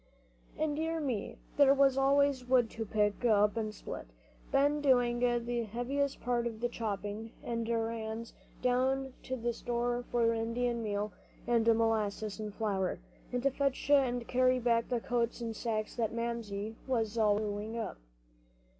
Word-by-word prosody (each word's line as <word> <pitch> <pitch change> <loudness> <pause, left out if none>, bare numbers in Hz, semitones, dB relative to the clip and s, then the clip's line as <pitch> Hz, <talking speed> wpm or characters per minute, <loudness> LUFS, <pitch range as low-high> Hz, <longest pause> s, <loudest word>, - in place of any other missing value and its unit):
And, 305 -1 0
dear 325 +1 -1
me, 255 -9 -3 0.2
there 280 -1 +7
was 275 -1 +5
always 275 -1 +3
wood 245 -3 +3
to 225 - -4
pick 210 +2 +1
up 210 -2 +4
and 220 -2 -1
split, - - -7 0.4
Ben 290 +2 +3
doing 245 -4 +3
the 240 -1 +1
heaviest 265 +6 -2
part 240 -1 0
of 225 -2 -6
the 240 +1 0
chopping; 215 0 -4
and 230 -1 -2
errands 225 0 -2 0.3
down 260 +1 +1
to 260 - -4
the 240 -1 -1
store 240 +1 -1
for 230 -1 +3
Indian 235 +1 -1
meal 210 -1 -2 0.3
and 235 -2 +2
molasses 220 -2 +1
and 215 -1 -4
flour, 200 -3 -1 0.3
and 245 0 -1
to 275 - +3
fetch 275 +1 -1
and 245 -4 +3
carry 255 0 +3
back 235 -1 +1
the 245 - +1
coats 235 0 -1
and 230 -1 -4
sacks 215 -2 -2
that 225 -3 0
Mamsie 225 -2 -3
was 230 -4 0
always 215 -2 +3
sewing 210 +2 -4
up. 225 -3 -4
235 Hz, 155 wpm, -32 LUFS, 220-255 Hz, 0.4 s, there